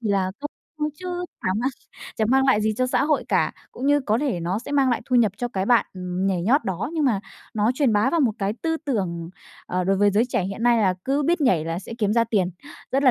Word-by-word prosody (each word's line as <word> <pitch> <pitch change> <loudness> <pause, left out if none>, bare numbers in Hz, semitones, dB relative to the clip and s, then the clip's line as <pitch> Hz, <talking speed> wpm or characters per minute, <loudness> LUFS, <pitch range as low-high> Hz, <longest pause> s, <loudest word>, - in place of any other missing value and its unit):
chỉ 225 - -3
là 195 -2 +1
câu 290 - -4 0.3
view 300 0 0
chứ 355 +2 -5 0.2
chả - - 0
mang 265 +3 0 0.5
chẳng 220 0 +1
mang 265 +1 +4
lại 260 -6 +4
gì 215 0 0
cho 255 - +1
xã 255 - +1
hội 300 -1 +1
cả. - - +2 0.2
Cũng 260 - -4
như 290 0 +4
có 220 -4 0
thể 260 -10 -1
nó 175 +4 -1
sẽ 245 - -8
mang 275 -2 +3
lại 240 - 0
thu 255 - +1
nhập 220 -5 +4
cho 245 +3 -2
cái 195 -5 -2
bạn, 240 0 +4
ừm, 180 0 -3
nhảy 185 -3 0
nhót 270 - +3
đó, 190 - -3
nhưng 315 -3 0
mà 225 -8 +2 0.3
nó 215 +2 +2
truyền 260 -4 +2
bá 210 +5 +3
vào 335 +1 +1
một 245 -6 +3
cái 195 0 0
tư 325 -1 0
tưởng, 175 - -2 0.4
ờ, 180 0 -1
đối 195 +1 +2
với 205 +1 +4
giới 210 +4 +3
trẻ 195 - 0
hiện 195 +4 -5
nay 240 -1 +4
là 190 -4 +2
cứ 280 +2 +1
biết 340 +4 +1
nhảy 185 - +3
là 165 +1 -3
sẽ 215 - -9
kiếm 210 -2 +1
ra 230 +1 +3
tiền, 200 -5 0 0.4
rất 270 - +2
là 265 - +6
225 Hz, 275 wpm, -23 LUFS, 195-270 Hz, 0.5 s, là